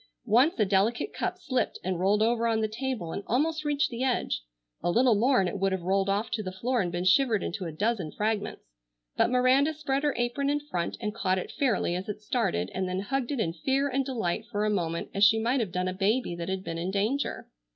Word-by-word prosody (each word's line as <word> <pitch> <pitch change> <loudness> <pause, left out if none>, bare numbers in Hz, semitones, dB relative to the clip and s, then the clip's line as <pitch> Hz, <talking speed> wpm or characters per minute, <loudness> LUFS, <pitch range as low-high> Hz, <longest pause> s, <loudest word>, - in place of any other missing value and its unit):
Once 250 - +3
a 210 - +4
delicate 205 - +1
cup - - -2
slipped 255 -3 -1
and 185 -1 -2
rolled 205 +3 +3
over 230 +1 +2
on 225 -1 +1
the 215 - +1
table 225 -6 -4
and - - -4
almost 310 +6 +1
reached 290 -1 +1
the 240 +2 -3
edge. 245 - 0 0.4
A - - 0
little 240 +6 +4
more 250 +5 +3
and 190 - +2
it 195 +3 -4
would 195 0 +1
have 190 -2 -2
rolled 195 +2 +1
off 205 +3 0
to 215 - -1
the 185 -3 -5
floor 235 +6 0
and 175 -2 -2
been 175 +1 -2
shivered 215 +3 +3
into 185 +1 -4
a 165 - -4
dozen 190 -1 -1
fragments, 210 0 -2 0.5
but - - +3
Miranda 255 +5 +3
spread 275 -2 -1
her 295 -1 0
apron 240 +4 0
in 290 +1 +1
front 180 -13 -3
and 210 -2 -3
caught 190 -4 0
it 185 - -4
fairly 250 - 0
as 185 +3 -5
it 210 - -4
started 205 - -1
and 185 0 -2
then 185 +1 -2
hugged 265 +5 -2
it 280 - -2
in 165 -6 0
fear 270 - 0
and 270 +1 0
delight 225 -5 -2
for 210 -3 -1
a 215 - +1
moment 170 -4 -2
as 200 - +1
she 220 +2 +7
might 240 +4 +1
have 215 -6 -2
done 180 0 -1
a 185 - -1
baby 205 +2 0
that 170 +1 -5
had 190 0 -2
been 165 -3 -4
in 175 +2 -2
danger. 215 +9 -1
215 Hz, 245 wpm, -28 LUFS, 190-255 Hz, 0.5 s, she